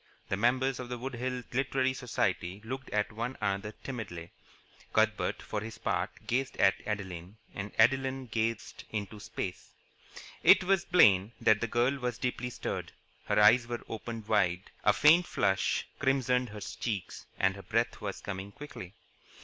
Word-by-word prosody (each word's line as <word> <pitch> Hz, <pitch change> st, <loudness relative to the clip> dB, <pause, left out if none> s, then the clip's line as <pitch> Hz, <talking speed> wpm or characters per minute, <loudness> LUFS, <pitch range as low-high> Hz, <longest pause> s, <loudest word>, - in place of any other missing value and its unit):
The -, -, +1 dB
members 130 Hz, +5 st, +1 dB
of 125 Hz, -1 st, -6 dB
the 125 Hz, -, -3 dB
Wood 130 Hz, +2 st, -5 dB
Hills 125 Hz, 0 st, -3 dB
Literary 130 Hz, 0 st, +1 dB
Society 110 Hz, -7 st, -1 dB
looked 130 Hz, +3 st, -5 dB
at 105 Hz, +1 st, 0 dB
one 120 Hz, +4 st, -4 dB
another 100 Hz, +1 st, -1 dB
timidly. 100 Hz, -10 st, -6 dB, 0.6 s
Cuthbert, -, -, +1 dB
for 105 Hz, -, -3 dB
his 110 Hz, +1 st, -7 dB
part, -, -, -1 dB, 0.2 s
gazed 130 Hz, +2 st, -1 dB
at 95 Hz, -, +5 dB
Adeline; 95 Hz, -2 st, -5 dB, 0.2 s
and 100 Hz, +1 st, -5 dB
Adeline 135 Hz, -1 st, +3 dB
gazed 115 Hz, -1 st, -2 dB
into 105 Hz, 0 st, -4 dB
space. -, -, -6 dB, 0.7 s
It -, -, +7 dB
was 190 Hz, -1 st, +2 dB
plain 105 Hz, -, +5 dB
that 110 Hz, -1 st, +4 dB
the 120 Hz, -, 0 dB
girl 125 Hz, +5 st, +1 dB
was 125 Hz, -2 st, -2 dB
deeply 125 Hz, -1 st, -2 dB
stirred. -, -, -4 dB, 0.3 s
Her -, -, +2 dB
eyes 115 Hz, +3 st, +6 dB
were 120 Hz, -1 st, -4 dB
opened 115 Hz, -1 st, -6 dB
wide, 90 Hz, -1 st, +1 dB
a 105 Hz, -, +6 dB
faint 160 Hz, +9 st, +5 dB
flush 95 Hz, 0 st, +1 dB
crimsoned 130 Hz, -2 st, +2 dB
her 105 Hz, 0 st, -8 dB
cheeks, 100 Hz, -3 st, -4 dB
and 95 Hz, 0 st, +2 dB
her 100 Hz, -, -9 dB
breath 115 Hz, +3 st, -1 dB
was 100 Hz, -2 st, -4 dB
coming 95 Hz, 0 st, -5 dB
quickly. 115 Hz, -7 st, -9 dB
115 Hz, 155 wpm, -31 LUFS, 100-130 Hz, 0.7 s, It